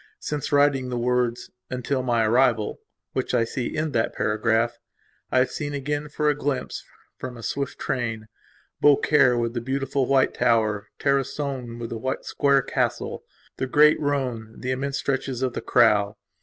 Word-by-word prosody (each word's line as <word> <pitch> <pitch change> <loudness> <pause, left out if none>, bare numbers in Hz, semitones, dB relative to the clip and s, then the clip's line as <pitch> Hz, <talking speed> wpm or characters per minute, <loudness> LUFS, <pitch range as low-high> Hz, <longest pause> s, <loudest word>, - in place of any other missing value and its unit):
Since 150 - -4
writing 140 -3 +3
the 125 - -2
words 120 0 0 0.2
"until 130 +1 -1
my 120 -3 +1
arrival", 115 -2 +2 0.3
which - - -1
I 115 - +3
see 120 +2 -3
end 155 -1 -1
that 115 - 0
paragraph, 110 +2 +1 0.5
I - - +2
have 130 0 +3
seen 145 -1 -4
again 145 +2 -3
for 150 +1 -1
a 150 - +4
glimpse, 145 -1 -3 0.4
from 125 -1 -6
a 115 - -10
swift 140 +3 -3
train, 115 -3 -2 0.6
Beaucaire 140 -3 +5
with 115 -1 -1
the 120 - -2
beautiful 135 +1 -1
white 135 -1 +3
tower, 110 -4 +1
Tarascon 135 -3 -1
with 115 -1 -6
the 130 +3 -2
square 140 -1 +2
castle, - - -2 0.3
the 130 - -2
great 150 +3 +5
Rhone, 125 -7 -2
the 130 - -2
immense 135 +2 -2
stretches 135 -2 -2
of 130 -2 0
the - - -4
Crau. 105 -4 +3
130 Hz, 160 wpm, -24 LUFS, 115-140 Hz, 0.6 s, Beaucaire